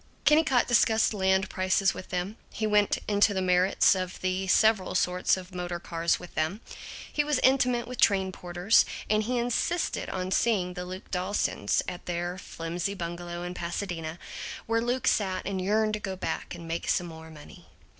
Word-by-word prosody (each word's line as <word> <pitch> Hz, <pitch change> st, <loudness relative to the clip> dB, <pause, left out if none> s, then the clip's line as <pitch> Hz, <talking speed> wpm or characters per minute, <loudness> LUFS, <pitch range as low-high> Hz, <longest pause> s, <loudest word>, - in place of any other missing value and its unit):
Kennicott 295 Hz, -4 st, +4 dB
discussed 225 Hz, -2 st, +3 dB
land 190 Hz, -1 st, +2 dB
prices 185 Hz, +1 st, +1 dB
with 185 Hz, -, -9 dB
them, 185 Hz, +4 st, -3 dB
he 220 Hz, -, -2 dB
went 210 Hz, -1 st, +3 dB
into 205 Hz, 0 st, +3 dB
the -, -, +1 dB
merits 180 Hz, +1 st, +4 dB
of 185 Hz, -1 st, -4 dB
the 185 Hz, +1 st, -1 dB
several 215 Hz, -1 st, +3 dB
sorts 180 Hz, +1 st, +2 dB
of 185 Hz, 0 st, -10 dB
motor 175 Hz, -1 st, -4 dB
cars 170 Hz, 0 st, 0 dB
with 180 Hz, -, -11 dB
them, 160 Hz, +7 st, -1 dB, 0.5 s
he 295 Hz, -, +2 dB
was 295 Hz, -2 st, +1 dB
intimate 250 Hz, -2 st, +3 dB
with 250 Hz, 0 st, -5 dB
train 190 Hz, -2 st, +3 dB
porters, 180 Hz, +4 st, +2 dB, 0.3 s
and 215 Hz, 0 st, +3 dB
he 250 Hz, +2 st, -1 dB
insisted 245 Hz, +8 st, -1 dB
on 185 Hz, 0 st, -3 dB
seeing 190 Hz, -4 st, +1 dB
the 180 Hz, 0 st, -5 dB
Luke 185 Hz, +1 st, -9 dB
Dawsons 180 Hz, -, 0 dB
at 175 Hz, -, -7 dB
their 175 Hz, +1 st, -3 dB
flimsy 170 Hz, +3 st, -4 dB
bungalow 175 Hz, -1 st, -5 dB
in 175 Hz, 0 st, -4 dB
Pasadena, 170 Hz, -2 st, -4 dB, 0.5 s
where 230 Hz, +1 st, +1 dB
Luke 245 Hz, +2 st, -1 dB
sat 190 Hz, -3 st, +1 dB
and 190 Hz, -1 st, -2 dB
yearned 215 Hz, +3 st, +1 dB
to 215 Hz, -, -1 dB
go 195 Hz, -2 st, -4 dB
back 185 Hz, -, -4 dB
and 170 Hz, -1 st, -9 dB
make 165 Hz, +1 st, -3 dB
some 175 Hz, -, +1 dB
more 160 Hz, -1 st, -10 dB
money. 150 Hz, -2 st, -14 dB
185 Hz, 175 wpm, -28 LUFS, 175-215 Hz, 0.5 s, Kennicott